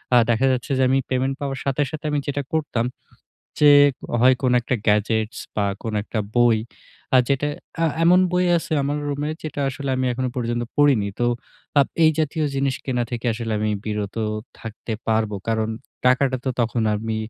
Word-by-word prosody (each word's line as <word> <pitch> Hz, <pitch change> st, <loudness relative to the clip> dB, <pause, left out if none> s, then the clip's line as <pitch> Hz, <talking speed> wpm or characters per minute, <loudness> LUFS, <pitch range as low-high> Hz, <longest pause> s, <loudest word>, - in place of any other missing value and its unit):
আ -, -, +8 dB
দেখা 120 Hz, +3 st, +3 dB
যাচ্ছে 130 Hz, +1 st, -2 dB
যে 130 Hz, -, +3 dB
আমি 135 Hz, +1 st, +3 dB
পেমেন্ট 130 Hz, +1 st, 0 dB
পাওয়ার 135 Hz, -2 st, -3 dB
সাথে, 140 Hz, +1 st, 0 dB
সাথে 155 Hz, -1 st, -7 dB
আমি 145 Hz, -, +1 dB
যেটা 145 Hz, 0 st, -1 dB
করতাম, 145 Hz, -7 st, 0 dB, 0.8 s
যে 150 Hz, -, +7 dB, 0.5 s
হয় 130 Hz, +2 st, +6 dB
কোনো 125 Hz, -1 st, +3 dB
একটা 130 Hz, -, -1 dB
গ্যাজেটস 110 Hz, +2 st, +1 dB, 0.2 s
বা 105 Hz, -, +2 dB, 0.2 s
কোনো 110 Hz, -2 st, -3 dB
একটা 110 Hz, -, -4 dB, 0.2 s
বই 120 Hz, -2 st, +5 dB, 0.6 s
আ -, -, +7 dB
যেটা 140 Hz, +1 st, +1 dB, 0.3 s
আ -, -, +4 dB, 0.2 s
এমন 180 Hz, +2 st, +6 dB
বই 180 Hz, 0 st, +2 dB
আছে 165 Hz, -, -3 dB
আমার 145 Hz, +2 st, -1 dB
রুমে 145 Hz, +1 st, -2 dB
যেটা 150 Hz, -2 st, -5 dB
আসলে 140 Hz, +1 st, -4 dB
আমি 130 Hz, 0 st, 0 dB
এখনো 130 Hz, +1 st, -2 dB
পর্যন্ত 120 Hz, -1 st, -1 dB
পড়িনি। 140 Hz, -9 st, +4 dB
তো 120 Hz, -, +3 dB, 0.5 s
আপ 140 Hz, -, +3 dB, 0.2 s
এই 155 Hz, -, +7 dB
জাতীয় 155 Hz, 0 st, 0 dB
জিনিস 135 Hz, -1 st, +1 dB
কেনা 125 Hz, -2 st, 0 dB
থেকে 120 Hz, +1 st, -3 dB
আসলে 115 Hz, 0 st, -4 dB
আমি 110 Hz, -, 0 dB, 0.2 s
বিরত 105 Hz, -1 st, -3 dB, 0.4 s
থাকতে 115 Hz, 0 st, -7 dB, 0.2 s
পারবো। 110 Hz, -1 st, +1 dB
কারণ 110 Hz, -1 st, 0 dB, 0.4 s
টাকাটা 130 Hz, +1 st, +3 dB
তো -, -, +2 dB
তখন 115 Hz, 0 st, 0 dB
আমি 110 Hz, +1 st, -3 dB
130 Hz, 180 wpm, -22 LUFS, 115-140 Hz, 0.8 s, আ